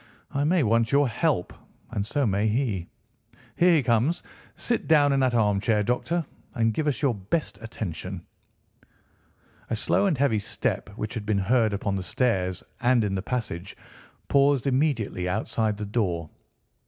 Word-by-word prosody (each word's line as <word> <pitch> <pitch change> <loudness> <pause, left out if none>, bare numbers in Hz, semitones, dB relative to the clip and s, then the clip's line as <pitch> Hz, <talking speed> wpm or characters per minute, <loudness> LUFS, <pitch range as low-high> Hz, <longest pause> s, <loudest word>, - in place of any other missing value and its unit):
I 140 - 0
may 170 0 +3
want 115 0 +2
your 140 0 +4
help, 120 - 0 0.4
and 100 - -1
so 145 +2 0
may 100 0 +1
he. 110 -6 -1 0.7
Here 175 0 +5
he 150 - +3
comes. 125 +7 +1 0.3
Sit 235 - -1
down 145 -3 +5
in 135 - +2
that 130 -2 +2
armchair, 105 0 +2
Doctor, 155 +9 -1 0.3
and 115 -2 +2
give 150 +6 -1
us 145 0 -1
your 135 -4 +3
best 105 - -3
attention." 110 -7 -6 1.4
A - - 0
slow 200 - +2
and 165 -7 +1
heavy 130 -5 +2
step, 100 - -2
which 110 -2 -4
had 115 -4 -4
been 105 -2 +2
heard 110 +3 +2
upon 100 0 -2
the - - -3
stairs 95 -3 0 0.2
and 120 -2 +3
in 100 -2 -1
the 95 - -1
passage, 100 -6 -4 0.5
paused 140 -1 +3
immediately 130 - 0
outside 110 +1 -1
the 105 - -4
door. 90 -7 -1
115 Hz, 160 wpm, -26 LUFS, 105-140 Hz, 1.4 s, Here